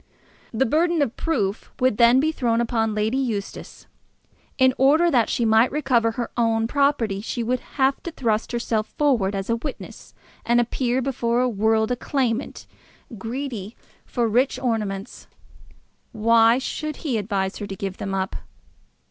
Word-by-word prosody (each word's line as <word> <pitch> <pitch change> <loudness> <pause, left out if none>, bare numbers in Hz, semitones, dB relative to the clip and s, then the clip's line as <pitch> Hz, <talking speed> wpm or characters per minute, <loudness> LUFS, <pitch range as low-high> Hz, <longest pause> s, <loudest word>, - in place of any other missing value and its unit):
The 240 +4 +1
burthen 325 +4 +2
of 240 - -3
proof 205 -12 -2
would 255 -4 +2
then 235 +2 +6
be 310 +3 +2
thrown 235 -6 0
upon 225 -2 0
Lady 220 +5 0
Eustace. 220 -7 -5 0.7
In 260 -1 +4
order 310 +6 +4
that 240 -4 +2
she 235 - 0
might 225 +2 +4
recover 245 -6 +1
her 235 0 -4
own 225 -1 +1
property 245 -8 +1
she 235 +2 -3
would 250 +2 0 0.2
have 270 0 +2
to - - -5
thrust 225 -7 -1
herself 230 -2 -1
forward 235 -10 +2
as 195 0 -3
a 230 - 0
witness, 275 +3 -8 0.3
and 240 +1 +3
appear 245 +1 0
before 240 -2 0
the 255 - +1
world 220 +1 +1
a - - +2
claimant, 250 -1 -2 0.5
greedy 230 -2 -5 0.3
for 240 -1 -1
rich 245 +5 +1
ornaments. 210 -5 -3 0.9
Why 230 +1 +4
should 305 +3 -4
he 250 -7 0
advise 195 -2 -2
her 205 - -5
to 195 - -6
give 195 0 -5
them 195 -1 -4
up? 190 0 -2
235 Hz, 155 wpm, -23 LUFS, 220-265 Hz, 0.9 s, then